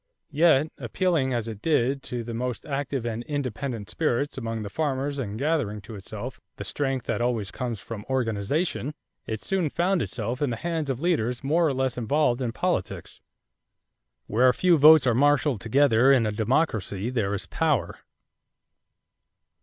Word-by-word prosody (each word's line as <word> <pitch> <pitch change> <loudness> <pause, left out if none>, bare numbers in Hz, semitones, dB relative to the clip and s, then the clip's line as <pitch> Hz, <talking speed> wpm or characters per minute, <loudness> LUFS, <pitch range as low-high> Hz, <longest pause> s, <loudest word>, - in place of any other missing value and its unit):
Yet, 155 -1 +4
appealing 165 -8 0
as 120 -2 -1
it 110 -2 -7
did 140 -3 +1
to 120 -1 -3
the 115 0 -6
most 125 +1 -3
active 135 -3 -3
and 115 -1 -3
independent 130 -6 -3
spirits 130 +10 -1
among 115 -3 -4
the 100 - -5
farmers 140 -1 -1
and 105 -5 -4
gathering 135 -7 0
to 110 - -11
itself 100 -3 -7 0.2
the - - -6
strength 135 -3 -2
that - - -1
always 115 -5 -1
comes 120 -5 -4
from 105 +1 -7
organization, 130 - -1 0.3
it 110 -1 -4
soon 185 - 0
found 175 +4 +1
itself 120 +3 -3
in 145 - +1
the 120 - -2
hands 160 +2 -3
of 130 0 -2
leaders 125 -8 0
more 160 +4 +3
or - - +1
less 130 -1 -1
involved 125 +1 +1
in 120 -3 -1
politics. - - -3 1.0
Where 125 +5 +4
a 125 - +1
few 180 -2 +4
votes 155 0 +8
are 125 - +3
marshaled 145 -2 +2
together 130 +1 +4
in 130 -4 +4
a 105 - 0
democracy, 110 - 0
there 105 -5 0
is 100 - -4
power. 155 -7 0
130 Hz, 165 wpm, -26 LUFS, 115-145 Hz, 1.0 s, votes